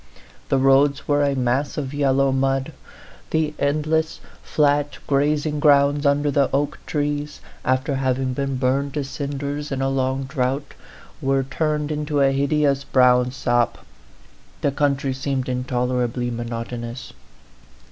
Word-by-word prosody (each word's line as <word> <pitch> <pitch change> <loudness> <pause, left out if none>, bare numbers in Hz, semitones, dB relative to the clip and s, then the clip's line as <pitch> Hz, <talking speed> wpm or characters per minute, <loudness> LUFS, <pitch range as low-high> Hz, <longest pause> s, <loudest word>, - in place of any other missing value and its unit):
The 135 - +3
roads 135 +1 +3
were 145 0 +2
a 140 -1 +1
mass 130 +3 0
of 140 -2 -3
yel 140 -2 +2
low 135 0 +3
mud; 135 0 0 0.6
the 155 -1 0
endless, 155 +2 0 0.2
flat 145 -1 +1
grazing 150 +2 +1
grounds 145 0 +4
under 145 +1 +2
the 140 0 +2
oak 140 +2 -1
trees, 145 0 -2 0.2
after 130 +3 0
having 130 -1 0
been 140 0 -2
burned 135 +2 0
to 145 - -1
cinders 145 +1 -4
in 135 - -2
a 135 0 +1
long 135 0 0
drought, 135 +1 -2 0.5
were 135 -1 +1
turned 150 +2 -1
into 150 -1 -1
a 135 -1 +4
hideous 140 0 +1
brown 125 -2 +4
sop; 120 -3 0 0.8
the 140 - +1
country 140 -1 0
seemed 135 0 -2
intolerably 125 -1 -1
monotonous. 120 +1 -5
140 Hz, 135 wpm, -22 LUFS, 130-145 Hz, 0.8 s, grounds